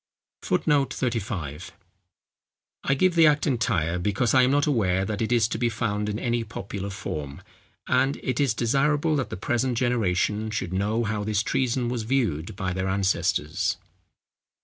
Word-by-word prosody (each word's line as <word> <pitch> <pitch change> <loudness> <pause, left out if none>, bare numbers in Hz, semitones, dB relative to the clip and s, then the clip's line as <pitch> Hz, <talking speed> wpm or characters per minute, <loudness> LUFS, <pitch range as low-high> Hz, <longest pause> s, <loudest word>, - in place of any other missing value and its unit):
[Footnote 145 -3 +1
35: 95 - -3 1.1
I 140 - +2
give 185 +5 +3
the 165 -2 +6
Act 150 -1 +3
entire, 90 - 0
because 105 +5 0
I 130 - +6
am 125 - +4
not 145 +1 +3
aware 95 -10 +1
that 105 +1 -3
it 110 - -1
is 115 -3 +4
to 110 - -3
be 120 -1 +2
found 105 -1 -2
in 105 - -2
any 120 0 -1
popular 100 -2 -6
form; 75 -8 -6 0.4
and 130 +2 +2
it 130 -2 -1
is 140 -6 +2
desirable 145 +6 +2
that 130 - -2
the - - -5
present 120 +4 0
generation 110 -3 0
should 100 -5 -3
know 105 +5 0
how 105 -1 -2
this 105 0 0
treason 125 -1 0
was 120 -1 -2
viewed 110 - -1
by 95 -2 -2
their 95 +1 -2
ancestors. 95 -6 0
110 Hz, 165 wpm, -25 LUFS, 95-130 Hz, 1.1 s, the